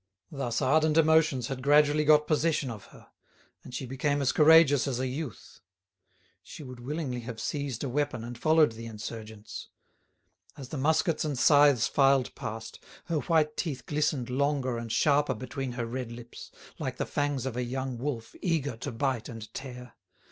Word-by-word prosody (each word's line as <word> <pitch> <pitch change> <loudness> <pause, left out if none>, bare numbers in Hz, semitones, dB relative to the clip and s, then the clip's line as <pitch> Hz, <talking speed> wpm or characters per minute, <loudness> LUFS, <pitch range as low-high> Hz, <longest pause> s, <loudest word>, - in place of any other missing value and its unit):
Thus 135 -2 -2
ardent 155 +3 +3
emotions 160 -5 +4
had 130 +1 -5
gradually 150 +2 +4
got 150 0 +5
possession 155 -4 +1
of 110 -4 -9
her, - - -17 0.5
and - - -11
she 130 +2 -4
became 145 +3 -1
as 135 -3 +2
courageous 155 -3 +6
as 125 -3 -2
a 130 - -1
youth. 130 -1 -6 0.8
She 155 - -11
would 125 -2 -9
willingly 135 -1 -4
have 115 -1 -7
seized 140 -1 -3
a - - -1
weapon 135 -3 -1
and 120 +1 -7
followed 155 +2 +4
the 115 +1 -8
insurgents. 110 -1 -8 0.9
As 135 -3 -9
the 155 - -5
muskets 160 +4 +2
and 150 -4 -2
scythes 145 -3 +5
filed 135 -2 +3
past, 110 +1 -7 0.2
her 165 -3 -1
white 155 -1 +1
teeth 140 -7 -3
glistened 145 -4 -1
longer 135 -1 0
and 115 -1 -6
sharper 145 +4 +2
between 130 0 -5
her 120 -1 -3
red 120 0 -5
lips, 120 0 -10 0.3
like - - -4
the - - -1
fangs 145 -3 -1
of 130 -3 -3
a 125 - -1
young 130 0 -4
wolf 120 -4 -4
eager 155 -8 0
to 140 - -5
bite 125 -1 -2
and 110 -2 -9
tear. 125 -2 -8
135 Hz, 170 wpm, -28 LUFS, 120-150 Hz, 0.9 s, courageous